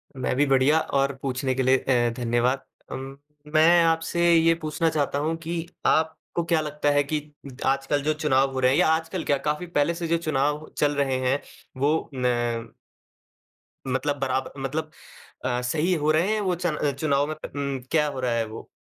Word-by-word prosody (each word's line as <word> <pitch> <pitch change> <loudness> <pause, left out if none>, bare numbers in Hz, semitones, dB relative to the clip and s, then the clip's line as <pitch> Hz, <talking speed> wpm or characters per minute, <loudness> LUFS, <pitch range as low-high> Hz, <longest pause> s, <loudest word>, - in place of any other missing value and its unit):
मैं 130 -1 -1
भी 145 +2 +3
बढ़िया, 135 +3 +4
और 140 -2 0
पूछने 130 -1 -1
के 130 - 0
लिए 130 +1 +4
अ, 120 -2 +1
धन्यवाद। 120 +2 +1 0.3
अम, 135 +1 -6 0.4
मैं 170 +2 +6
आपसे 165 +1 +2
ये 165 0 +5
पूछना 155 +2 0
चाहता 145 -2 -1
हूँ 160 +2 -1
कि 170 0 -3 0.2
आपको 160 +2 0
क्या 165 -2 +2
लगता 150 -1 -1
है 145 0 +3
कि 150 +2 -1 0.3
उ, - - -7 0.2
आजकल 135 +2 +1
जो 155 - +1
चुनाव 135 -3 +2
हो 130 - -2
रहे 130 0 +4
हैं 140 - +2
या - - +4
आजकल 165 +2 0
क्या 140 - +1
काफ़ी 150 +4 -2
पहले 165 -1 +1
से 170 -1 -3
जो 170 - +2
चुनाव 150 -1 -1
चल 145 -1 +2
रहे 135 -2 +1
हैं 140 +2 +1 0.4
वो 150 +4 +1
न 120 -2 -1 1.1
मतलब 135 +3 -1
बराब 130 -1 -1
मतलब 155 +4 -3 0.5
अ, 125 -1 0
सही 155 +8 0
हो 155 -2 +1
रहे 170 +7 +2
हैं 215 - 0
वो 185 -3 0
चन 175 -3 -2 0.2
चुनाव 145 -1 +1
मत 155 - -7
उम, 140 -1 -2
क्या 150 -2 +3
हो 140 -3 -5
रहा 125 -2 0
है 115 -1 0
वो? 110 +1 -9
145 Hz, 190 wpm, -25 LUFS, 130-160 Hz, 1.1 s, मैं